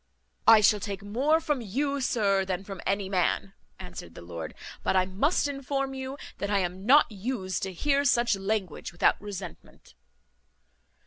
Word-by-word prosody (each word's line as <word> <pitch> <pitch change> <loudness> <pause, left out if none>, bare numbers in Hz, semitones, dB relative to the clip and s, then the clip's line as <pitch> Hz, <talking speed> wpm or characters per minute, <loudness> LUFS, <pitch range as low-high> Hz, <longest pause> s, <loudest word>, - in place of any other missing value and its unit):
"I 225 -1 +9
shall 210 0 +5
take 200 -1 -5
more 265 +10 +2
from 295 -5 -1
you, 275 +6 -1
sir, 200 -6 +2
than 190 0 -3
from 195 -2 -8
any 195 0 0
man," 190 +1 0 0.2
answered 180 - -9
the - - -10
lord; 85 -2 -7 0.3
"but - - 0
I 185 -1 +4
must 270 - +1
inform 275 -1 -2
you 265 +1 -5 0.2
that 200 - -2
I 205 - +2
am 185 +2 -2
not 280 -1 +6
used 200 -2 -3
to 190 -2 -3
hear 280 - +1
such 240 -5 +3
language 195 -3 -3
without 175 - +2
resentment." 190 - -9
205 Hz, 165 wpm, -28 LUFS, 190-265 Hz, 0.3 s, I